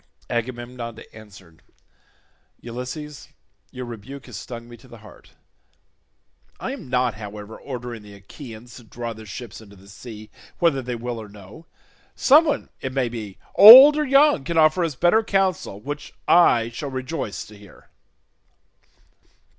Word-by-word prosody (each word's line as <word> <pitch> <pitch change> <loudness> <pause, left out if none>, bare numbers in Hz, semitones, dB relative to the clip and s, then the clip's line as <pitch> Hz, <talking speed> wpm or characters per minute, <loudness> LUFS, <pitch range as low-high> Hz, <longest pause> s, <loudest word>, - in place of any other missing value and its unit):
Agamemnon 120 -1 -5 0.2
answered, 95 -6 -16 1.0
"Ulysses, 130 +5 -8 0.4
your 125 0 -8
rebuke 120 +4 -10
has - - -11
stung 120 -1 -9
me 120 - -12
to 130 - -19
the 120 - -13
heart. 110 - -17 1.3
I - - -4
am - - -9
not, 125 -2 0
however, 105 0 -9
ordering 120 -4 -8
the 105 -1 -14
Achaeans 115 +3 -12
to 120 - -14
draw 115 +1 -7
their 110 0 -13
ships 115 +1 -9
into 100 -2 -16
the 95 +1 -19
sea 110 +1 -12 0.3
whether 160 -6 +1
they 125 -1 -5
will 120 0 -5
or 105 - -11
no. 105 - -15 0.5
Someone, 300 +2 +3
it 130 -1 -5
may 130 -3 0
be, 110 -5 -8 0.2
old 260 +8 +11
or 300 - 0
young, 275 - +4
can 170 +3 -3
offer 155 +3 +4
us 160 -4 -3
better 175 - +3
counsel 190 - -1
which 145 +6 -7
I 120 -10 +4
shall 130 +5 -6
rejoice 130 -3 -5
to 105 - -15
hear." 100 -1 -18
120 Hz, 145 wpm, -22 LUFS, 110-150 Hz, 1.3 s, old